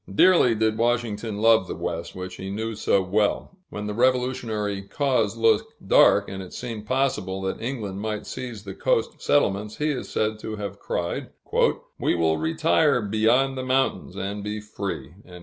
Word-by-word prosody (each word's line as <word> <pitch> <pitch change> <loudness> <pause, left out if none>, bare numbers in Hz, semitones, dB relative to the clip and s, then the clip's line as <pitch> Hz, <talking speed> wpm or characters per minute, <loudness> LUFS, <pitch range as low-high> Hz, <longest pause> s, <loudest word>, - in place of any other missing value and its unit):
Dearly 125 - +5
did 110 0 +1
Washington 115 -3 0
love 110 -3 +4
the - - -4
West, - - -4
which 90 0 -6
he 95 - -6
knew 110 +3 -3
so 100 -2 +2
well; 105 - 0
when 105 0 -5
the 105 - -3
Revolutionary 120 -4 0
cause 115 -1 0
looked 115 0 +2
dark, - - +5
and 95 0 -6
it 95 - -10
seemed 115 -4 -6
possible 130 -8 0
that 95 - -3
England 110 -6 -4
might 110 -1 -3
seize 120 -5 -6
the 95 -2 -7
coast - - 0
settlements, 105 +2 +1
he 150 +1 +1
is 130 - -4
said 110 0 -1
to 110 0 -5
have 105 -1 -6
cried, - - -3 0.7
"We - - +1
will 80 -2 +2
retire 160 -3 +2
beyond 110 +6 +2
the 130 - -3
mountains, 130 +1 0
and 100 +1 -4
be 105 +1 -3
free!" 100 -9 -5
110 Hz, 165 wpm, -25 LUFS, 100-125 Hz, 0.7 s, Dearly